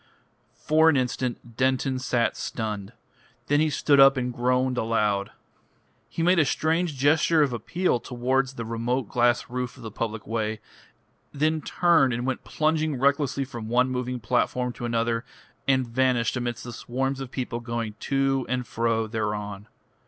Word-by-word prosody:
For 160 +2 +4
an 150 - +3
instant 125 -2 -3
Denton 130 0 +1
sat 125 -2 0
stunned. 105 -4 -4 0.5
Then 145 +1 +2
he 155 0 +3
stood 140 0 +3
up 135 0 +7
and 125 -1 -2
groaned 125 +1 +1
aloud. 105 -3 0 0.8
He 165 - -3
made 180 +1 +4
a - - +6
strange 160 +1 0
gesture 155 +3 +4
of 135 -4 0
appeal 125 - 0
towards 130 +2 -1
the 115 - -5
remote 115 +1 -2
glass 120 0 +2
roof 125 0 -4
of 130 - -12
the 110 - -6
public 110 0 -4
way, 110 -1 -2 0.7
then 155 +2 0
turned 150 -6 +3
and 120 +1 -2
went 130 -1 -2
plunging 155 -1 0
recklessly 140 0 +1
from 120 -4 -7
one 125 +2 +2
moving 125 0 -2
platform 125 +2 0
to 120 - -6
another, 115 0 0 0.4
and 130 -2 +2
vanished 125 0 +1
amidst 120 -1 -3
the 120 - -7
swarms 135 +3 -2
of 135 -2 -6
people 125 -2 -4
going 115 -2 -4
to 135 -1 0
and 125 0 -1
fro 115 -1 0
thereon. 105 -2 -4
125 Hz, 160 wpm, -25 LUFS, 115-135 Hz, 0.8 s, up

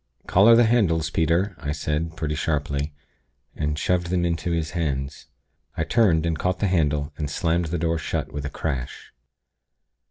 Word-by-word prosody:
'Collar 105 +5 +6
the 120 0 +6
candles, 85 -9 +2
Peter!' 85 +5 +1
I 75 -1 -3
said, 80 +2 -2
pretty 75 -2 -2
sharply, 75 -1 -1 0.6
and 75 -1 -2
shoved 90 +1 0
them 90 0 0
into 85 0 -1
his 80 -2 -1
hands. 70 -3 -3 0.5
I 80 - +1
turned, 85 -5 +3
and 80 -2 -1
caught 90 0 0
the - - 0
handle, 75 -5 +1
and 75 -3 -3
slammed 85 +3 0
the 85 +2 -2
door 80 0 0
shut, - - -3
with 70 -1 -4
a 70 - -3
crash. 70 -4 -5
80 Hz, 165 wpm, -24 LUFS, 75-85 Hz, 0.6 s, Collar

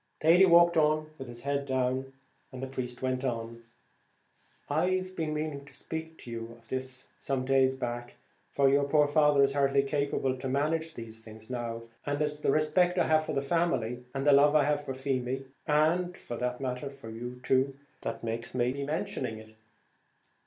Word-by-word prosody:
Thady 170 +4 +6
walked 170 -1 +6
on 155 0 +2
with 135 - -6
his 120 0 -9
head 140 +1 -1
down, 130 0 -1 0.4
and 130 0 -7
the - - 0
priest 130 -2 -5
went 130 0 0
on. 115 -2 -3 1.1
"I've 185 +5 0
been 160 -3 -2
meaning 150 -2 -3
to 140 - -16
speak 160 +4 -6
to 120 - -9
you 115 0 -4
of 115 - -26
this 130 0 -4
some 135 -2 -1
days 135 0 +3
back, 120 -1 -5 0.3
for 140 -1 +3
your 140 +1 +4
poor 150 +1 +4
father 145 -1 +4
is 135 0 +2
hardly 140 -1 +3
capable 140 -2 0
to 135 - -3
manage 160 +4 0
these 115 -1 -8
things 110 +1 -12
now; 115 -2 -4 0.2
and 145 0 -2
it's 150 -1 -1
the - - 0
respect 155 +5 +3
I - - +4
have 155 0 +3
for - - -3
the 140 -1 0
family, 135 -7 0
and 135 +1 -1
the 145 - +6
love 145 +2 +6
I 150 - +6
have 145 0 +1
for 135 -2 -5
Feemy, 130 0 -2 0.2
and, 170 +4 +2
for 120 - -7
the 125 +1 -1
matter 130 +1 -3
of 140 - -8
that, - - -17
for 115 -5 -9
you 120 +2 -7
too, 135 +1 +2 0.3
that 115 - -4
makes 115 +2 -4
me 125 0 +2
be 140 +1 -4
mentioning 145 - -3
it. 110 0 -13
135 Hz, 195 wpm, -30 LUFS, 125-150 Hz, 1.1 s, Thady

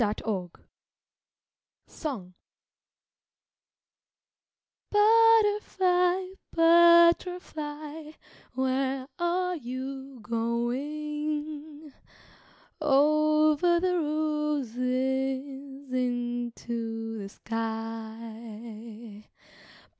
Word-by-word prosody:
BUTTERFLY 205 -4 -2 1.2
Song 220 - -6 2.6
Butterfly, 415 -4 +4 0.3
butterfly, 330 -2 +3 0.4
where 260 +1 0
are 360 +1 0
you 265 +1 -6
going? 295 +6 -3 0.9
"Over 305 +3 +4
the 360 0 +1
roses 270 -2 -2
into 240 -2 -3
the 195 -1 -6
sky." 225 0 -7
275 Hz, 40 wpm, -28 LUFS, 235-310 Hz, 2.6 s, Butterfly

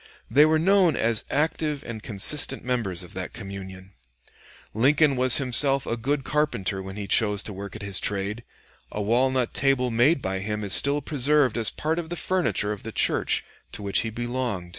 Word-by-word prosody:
They 150 +2 +6
were 155 0 +3
known 180 -1 +3
as 115 -1 0
active 150 0 -1
and 115 -2 -7
consistent 110 +9 +1
members 110 -8 -2
of 90 - -13
that 95 -1 -6
communion. 95 -3 -9 0.8
Lincoln 140 +5 +3
was 130 -1 +4
himself 135 +1 +3
a 115 - -2
good 135 +4 -2
carpenter 115 -11 -1
when 95 0 -8
he 105 -1 -5
chose 105 0 +1
to 105 - -6
work 100 +1 -8
at 110 - -8
his 100 -1 +3
trade; 100 +3 -2 0.5
a - - -5
walnut 125 +4 0
table 135 -2 +1
made 125 +8 +3
by 95 -5 -3
him 105 +2 -4
is 100 -2 0
still 145 +1 +3
preserved 145 -2 +1
as 115 -3 +1
part 160 +2 -2
of 165 -2 -6
the 175 - -4
furniture 120 - -1
of 105 - -6
the 115 - -7
church - - +2 0.3
to 105 - -7
which 100 -1 0
he 115 - -2
belonged. 120 -5 -4
120 Hz, 185 wpm, -24 LUFS, 100-140 Hz, 0.8 s, They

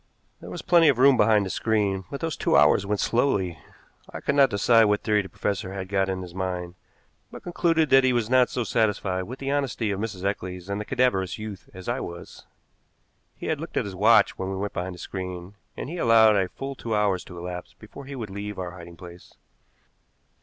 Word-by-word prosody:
There - - -10
was - - -7
plenty 170 -2 +5
of 140 -5 +4
room 135 +1 +6
behind 105 -2 +4
the 95 - -4
screen, 100 -4 0
but 140 - -6
those 165 -1 -2
two - - +2
hours 75 +7 +4
went 105 0 -1
slowly. 95 - 0 0.5
I - - -7
could 140 - -1
not 140 -2 +5
decide 115 +2 +4
what 105 0 +1
theory 105 -1 +2
the 95 - -10
professor 100 -1 -3
had 95 -1 -5
got 95 -1 +1
in 95 -1 -3
his 90 -1 -10
mind, 90 -2 -4 0.6
but - - -11
concluded 165 -3 +1
that 135 0 +7
he 130 - +3
was 120 -3 0
not 130 0 +4
so 125 - -2
satisfied 100 -4 0
with 125 +6 -8
the 135 0 -3
honesty 130 -6 -1
of 100 - -3
Mrs. 100 -4 -5
Eccles 90 -2 -4
and 100 +1 -2
the - - -6
cadaverous 95 -8 0
youth 105 -3 -8
as 95 0 -11
I 120 +2 -1
was. 85 -6 -9 0.9
He - - -9
had - - -1
looked - - -6
at - - +1
his 100 - -6
watch 105 +5 +4
when 95 - -3
we 95 - -3
went 100 +1 -3
behind 90 0 -4
the - - -13
screen, 90 0 -6 0.2
and - - -5
he 170 +5 -6
allowed 110 -3 +5
a 95 -2 +1
full 135 0 -6
two 115 -4 -4
hours 100 -3 +1
to 90 - -11
elapse 90 +1 -7
before 125 +6 -12
he 140 +1 -7
would 110 -6 -6
leave 100 +1 -6
our 90 -2 -4
hiding 85 -1 -12
place. 90 0 -13
105 Hz, 225 wpm, -25 LUFS, 95-120 Hz, 0.9 s, that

